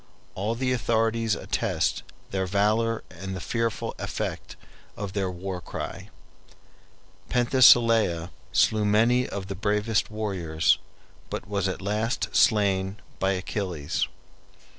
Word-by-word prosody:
All 105 +4 -2
the 130 +1 -1
authorities 115 -2 +1
attest - - -1 0.3
their 95 -1 -1
valor 110 +4 +1
and 95 +2 -6
the - - -4
fearful 115 +4 -2
effect - - -4 0.4
of 100 -2 -5
their 95 -2 -1
war 90 0 -5
cry. - - -6 1.2
Penthesilea 115 -8 +5 0.2
slew 110 -1 +3
many 115 +5 +3
of 100 -1 -5
the 100 - -5
bravest 105 +2 0
warriors, 95 -7 +1 0.5
but - - -5
was 100 -2 0
at 95 0 -4
last 105 +4 -1
slain 100 -3 +3 0.2
by 95 +1 +2
Achilles. 90 -5 -2
105 Hz, 115 wpm, -26 LUFS, 95-115 Hz, 1.2 s, Penthesilea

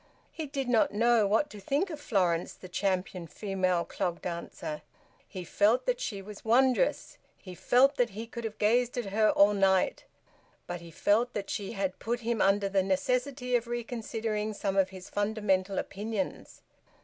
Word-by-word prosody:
He 315 -2 -5
did 275 -2 -3
not 240 -3 +3
know 230 0 +3
what 220 +9 +1
to 210 - -9
think 285 - -1
of 305 - -6
Florence, 180 -9 +1
the 185 - -12
champion 185 -2 -2
female 185 -2 -1
clog 175 -1 -3
dancer. 170 -3 -5 0.5
He 185 -3 -7
felt 210 +7 +2
that - - 0
she 200 - -4
was 210 +1 -10
wondrous; 255 - +2 0.2
he 185 - -10
felt 260 - +3
that 245 - +2
he 215 +4 -6
could 235 +1 -8
have 220 -1 -5
gazed 240 +4 +2
at 245 - -1
her 215 0 +4
all 200 +1 +5
night; 190 -2 +2 0.6
but 175 -1 -5
he 170 - -11
felt 220 +8 +1
that 200 -1 -3
she 200 -2 -4
had 195 -2 -2
put 240 +2 -2
him 230 -1 -1
under 195 +1 +3
the 195 0 +2
necessity 250 +6 0
of 235 -1 0
reconsidering 225 -3 -3
some 195 -1 -2
of 190 -1 +3
his 185 -1 -10
fundamental 205 -2 0
opinions. 220 +7 -4
210 Hz, 175 wpm, -29 LUFS, 190-240 Hz, 0.6 s, all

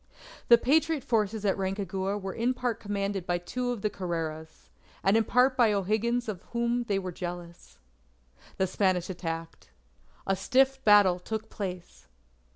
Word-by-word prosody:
The 235 - +8
Patriot 305 +3 +2
forces 220 -4 0
at 195 - +2
Rancagua 195 0 -2
were 190 -1 -5
in 245 +3 0
part 245 -3 -2
commanded 200 -2 -3
by 175 0 +1
two 245 +8 -3
of 240 -5 -3
the 210 - +2
Carreras, 160 -4 -5 0.4
and 195 +2 +4
in 225 - +4
part 255 +3 +3
by 240 -4 +4
O'Higgins 220 +5 0
of 195 -5 -4
whom 235 0 0
they 200 -3 0
were 185 -1 -3
jealous. 175 -1 -8 0.8
The 190 - +2
Spanish 185 -1 0
attacked. 165 - -6 0.6
A 195 - +1
stiff 265 +7 +2
battle 205 -4 +6
took 220 +4 -5
place. 180 - -7
200 Hz, 155 wpm, -28 LUFS, 180-235 Hz, 0.8 s, The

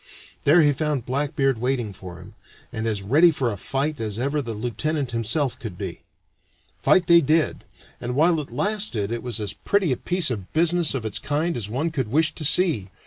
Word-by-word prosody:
There 160 +3 +6
he 145 -1 +4
found 145 -3 -2
Blackbeard 135 -1 0
waiting 120 -4 -1
for 90 -2 -10
him, 95 +4 -13 0.4
and 110 -1 -3
as 105 -3 -2
ready 150 - +5
for 135 -7 -1
a - - -4
fight 135 +7 -2
as 105 -2 -3
ever 140 +4 -1
the 115 -4 -5
lieutenant 125 +5 -2
himself 120 +4 -1
could 105 -7 -7
be. - - -6 0.8
Fight 185 - +4
they 170 0 +6
did, 155 +2 +1 0.3
and 125 +1 -4
while 165 +3 +3
it 145 - -6
lasted 130 - 0
it 120 0 -3
was 120 -2 -5
as 105 -2 -3
pretty 200 -7 0
a 125 - 0
piece 180 -6 0
of 100 -6 -5
business 170 -1 +2
of 120 -4 -3
its 110 - -2
kind 155 +4 -1
as 105 -4 -4
one 145 +9 -1
could 135 -7 -2
wish 155 +7 +2
to - - -5
see. 150 - +2
135 Hz, 200 wpm, -23 LUFS, 115-155 Hz, 0.8 s, There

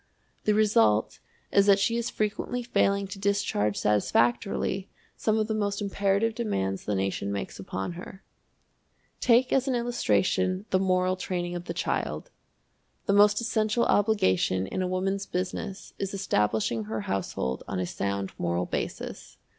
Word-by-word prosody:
The 210 - +4
result 110 - +3 0.3
is 200 0 +4
that 200 -1 +7
she 230 +3 +1
is 235 0 -1
frequently 215 +3 -2
failing 200 -4 +2
to 195 0 -8
discharge 195 - 0
satisfactorily 120 - +1 0.3
some 220 0 +1
of 215 - +2
the 220 - -2
most 205 -2 -1
imperative 200 +2 +1
demands 95 - -2
the 105 - 0
nation 95 +1 -1
makes 100 -1 -4
upon 95 - -4
her. 180 +2 -10 1.0
Take 250 +1 +4
as 265 0 +2
an 260 - +1
illustration 190 -5 +1
the 185 - +4
moral 185 -1 +2
training 175 -2 -3
of 175 0 -5
the - - -5
child. - - -2 0.7
The 200 - +2
most 205 +2 +5
essential 220 0 +1
obligation 95 - +2
in 185 - -3
a 185 - 0
Woman's 195 +2 -1
Business 190 +2 -4
is 195 0 -3
establishing 110 - 0
her 110 0 -3
household 85 -10 -2
on 95 - -3
a 90 - 0
sound 100 +2 -3
moral 85 +1 0
basis. - - -5
190 Hz, 150 wpm, -27 LUFS, -, 1.0 s, that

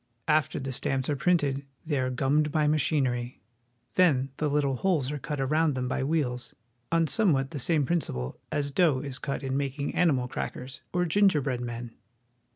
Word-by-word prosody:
After 155 -1 +2
the 135 0 -4
stamps 130 +2 -1
are - - +1
printed 140 -3 +1 0.2
they 150 -4 0
are 130 0 0
gummed 140 +4 +1
by 155 -1 +2
machinery. 135 -5 +1 0.5
Then 140 -8 +3
the 150 - 0
little 140 -2 +1
holes 155 -5 +1
are 150 - -4
cut 150 +1 -4
around 150 +2 +2
them 125 -1 -2
by 130 - -1
wheels, 135 -5 -1 0.4
on 165 0 +3
somewhat 145 -5 +2
the 150 - -4
same 150 +2 +2
principle 65 - -2
as 145 -2 -1
dough 150 -4 +3
is 135 -2 -5
cut 140 -1 -3
in 130 0 -2
making 140 +1 -2
animal 135 -8 +2
crackers 130 +1 -5
or 180 0 +1
gingerbread 155 -9 +2
men. 120 -1 -5
140 Hz, 170 wpm, -28 LUFS, 130-155 Hz, 0.5 s, Then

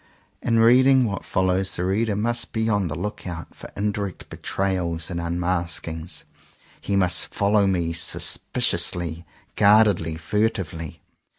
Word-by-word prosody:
In 115 -1 +1
reading 130 +3 +6
what 100 -3 -3
follows 95 0 0
the 90 - -2
reader 105 +3 0
must 120 +3 -1
be 110 0 0
on 100 -4 +1
the 75 - -4
lookout 90 -2 -6
for - - -11
indirect 100 -2 -3
betrayals 90 -3 -2
and 85 -1 -3
unmaskings. 85 -1 -3 0.6
He 100 - -2
must 90 -3 +2
follow 100 0 +2
me 85 -3 0
sus 85 +2 +1
piciously, 85 -1 -1 0.3
guardedly, 100 -6 +4
furtively. 85 -4 -2
95 Hz, 125 wpm, -23 LUFS, 85-105 Hz, 0.6 s, reading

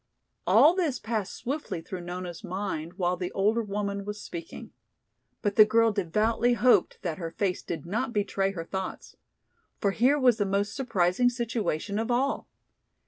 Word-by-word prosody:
All 310 +4 +7
this 335 -9 0
passed 220 -4 -3
swiftly 280 - -4
through 180 +2 -7
Nona's 175 -1 -6
mind 180 -4 -4
while 180 -1 0
the 180 0 -4
older 215 +4 +2
woman 200 -1 -3
was 210 +1 -6
speaking. 170 -4 -8 0.7
But 205 -2 -1
the 215 - +11
girl 225 +1 +3
devoutly 215 +5 +1
hoped 245 +1 +3
that 170 -2 -3
her 165 -2 -3
face 180 +2 -1
did 170 - -5
not 230 +8 -2
betray 200 -2 0
her 165 -3 -5
thoughts. 190 +1 -5 0.6
For 200 - +1
here 255 +8 +3
was 250 -5 +4
the 205 - +1
most 200 +1 0
surprising 235 -3 +2
situation 220 -5 -2
of 225 +2 -2
all! 260 +3 0
205 Hz, 160 wpm, -28 LUFS, 180-235 Hz, 0.7 s, the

